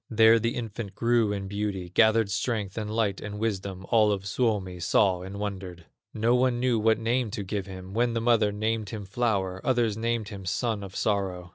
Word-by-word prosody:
There 115 0 +6
the 115 +2 -1
infant 110 -3 -5
grew 115 -2 +2
in 100 -1 -3
beauty, 100 -3 -3
Gathered 110 0 +4
strength, 105 -1 -2
and 110 -2 -3
light, 105 -3 0
and 105 0 -6
wisdom, 100 -3 -3
All 110 -3 +4
of 95 -1 -2
Suomi 100 -4 -1
saw 90 +1 +2
and 95 +2 -7
wondered. 95 -4 -5 0.3
No 115 +2 +1
one 125 -1 +2
knew 125 -2 +2
what 110 0 +3
name 115 +1 0
to 105 -1 -4
give 100 0 -4
him; 95 0 -9
When 120 +2 +1
the - - +1
mother 115 -3 +3
named 110 0 -2
him, 105 -1 -6
Flower, 95 -3 -1
Others 120 -5 +1
named 115 -1 -1
him, 100 -3 -8
Son 100 +3 -1
of 95 -1 -9
Sorrow. 95 -4 -1
105 Hz, 195 wpm, -27 LUFS, 95-115 Hz, 0.3 s, There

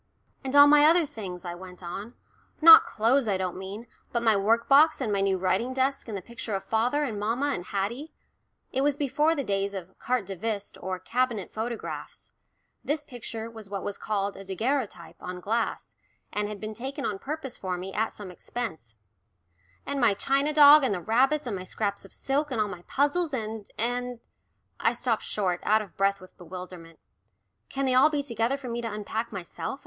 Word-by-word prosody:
"And 265 +1 -3
all 285 0 +10
my 295 0 +7
other 335 +1 +5
things," 190 -9 -8
I 175 - -4
went 180 +1 -11
on, 195 +7 -6 0.4
"not 325 0 +10
clothes, 235 +3 +2
I 200 -2 +1
don't 185 -1 -2
mean, 195 +5 -7 0.3
but 235 -1 -1
my 225 -2 +5
workbox 235 +10 +4
and 225 -6 -1
my 200 - +1
new 195 -1 +2
writing 190 +7 0
desk, 270 0 0
and 215 -3 -4
the 185 - -8
picture 230 -2 -5
of 195 - -3
father 245 +7 +1
and 225 -7 -3
mamma 240 +7 0
and 175 - -5
Haddie" 235 +12 -3 0.6
it 265 - 0
was 285 0 +2
before 295 +3 +2
the 280 - -2
days 200 -2 -1
of 190 0 -8
"carte 250 -5 0
de 195 +1 -6
visite" 205 +1 -4
or 185 +1 -3
"cabinet" 230 +1 -1
photographs; 230 +1 -6 0.5
this 295 +1 -1
picture 230 -4 -6
was 220 -3 -11
what 200 -1 -4
was 205 - -4
called 200 -2 -2
a 195 - -9
"daguerreotype" 215 -1 -3
on 180 0 -6
glass, 225 +5 -2 0.4
and 210 0 -1
had 210 -1 -6
been 215 +1 -5
taken 270 +5 -5
on 200 -2 -2
purpose 280 -1 -5
for 185 -2 -3
me 190 +2 -6
at 220 +2 0
some 200 -3 -9
expense 165 - -6 0.9
"and 280 -1 -2
my 225 -4 +4
china 275 +7 +1
dog 295 0 +8
and 215 -6 +1
the - - -3
rabbits, 260 - +2
and 230 -5 -3
my 185 - -5
scraps 200 +2 -3
of - - -15
silk, 285 +2 -1
and 255 -5 -2
all 215 - +2
my 180 -4 -8
puzzles, 290 +2 +1
and, 220 -3 -5
and 245 +1 -2 0.3
" - - -46
I 230 - +2
stopped 240 -2 0
short, 185 -4 -1
out 215 +1 +3
of 200 - -15
breath 195 0 +1
with 185 - -15
bewilderment. 175 -1 -9 0.7
"Can 275 0 -2
they 260 - +2
be - - +3
all 260 +4 +7
together 275 -4 -1
for 275 -2 -9
me 235 0 -3
to 230 -1 -4
unpack 220 +2 -4
myself?" 180 +4 -5
225 Hz, 200 wpm, -27 LUFS, 195-265 Hz, 0.9 s, all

